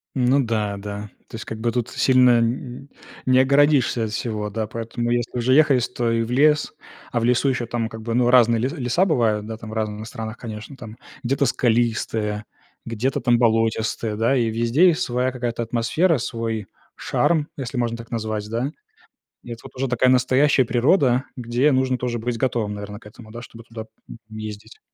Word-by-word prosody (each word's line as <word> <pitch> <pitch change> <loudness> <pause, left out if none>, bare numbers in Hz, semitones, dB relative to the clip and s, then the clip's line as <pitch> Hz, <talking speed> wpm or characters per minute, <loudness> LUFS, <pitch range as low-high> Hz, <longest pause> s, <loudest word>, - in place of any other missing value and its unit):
Ну 130 +1 +3
да, 105 -3 -1
да. 105 +1 -7 0.2
То - - -10
есть 115 - -6
как 110 - -6
бы 115 +1 0
тут 120 -1 -2
сильно 125 -1 +4
н 120 +2 -2
н 140 - -14 0.4
не 130 0 +4
огородишься 135 -3 +3
от 110 - -5
всего, 105 -1 -3
да. 110 +1 -3
Поэтому, 115 +2 -4
если 120 0 -1
уже 120 +2 +2
ехаешь, 140 -4 +4
то 120 -1 -2
и 115 0 +1
в 115 - -6
лес. 150 +3 +3 0.4
А 120 - 0
в 115 - -1
лесу 125 +3 +2
еще, 120 -2 -1
там, 115 -1 -3
как 110 -1 -9
бы, 115 +1 -3
ну 120 0 +3
разные 120 -2 +5
ле 125 +4 0
леса 135 +3 0
бывают, 115 - +1
да, 110 0 -6
там 110 -1 -9
разные 110 -1 -3
в - - -9
странах, 110 -2 -7
конечно, 110 +3 -8
там, 110 -3 -10 0.3
где-то 135 +3 +1
скалистые, 110 -3 0 0.4
где-то, 115 +3 -2
там, 120 -1 +3
болотистые, 115 -1 +1
да. 115 +5 +2
И 115 -2 +1
везде 120 +10 +3
есть 170 -3 +2
своя 125 +1 0
какая-то 120 -2 -3
атмосфера, 125 +9 +1
свой 115 -3 -4 0.3
шарм, 155 -3 0
если 130 -1 -5
можно 120 -1 -1
так 115 0 -11
назвать, 110 -2 -3
да? 120 +5 -2 0.7
Это 115 -1 -7
вот - - -13
уже 135 +1 -1
такая 125 +1 +2
настоящая 130 +2 +3
природа, 125 +2 +2
где 125 +4 +1
нужно 130 -1 +1
тоже 125 -1 -3
быть 120 +1 -3
готовым, 115 -5 -1
наверно, 105 0 -7
к - - -22
этому, 110 +1 -13
да, 120 +2 -8
чтобы 115 -1 -12
туда, 115 -1 -8 0.3
м, - - -9
ездить. 110 0 -8
120 Hz, 195 wpm, -22 LUFS, 110-130 Hz, 0.7 s, разные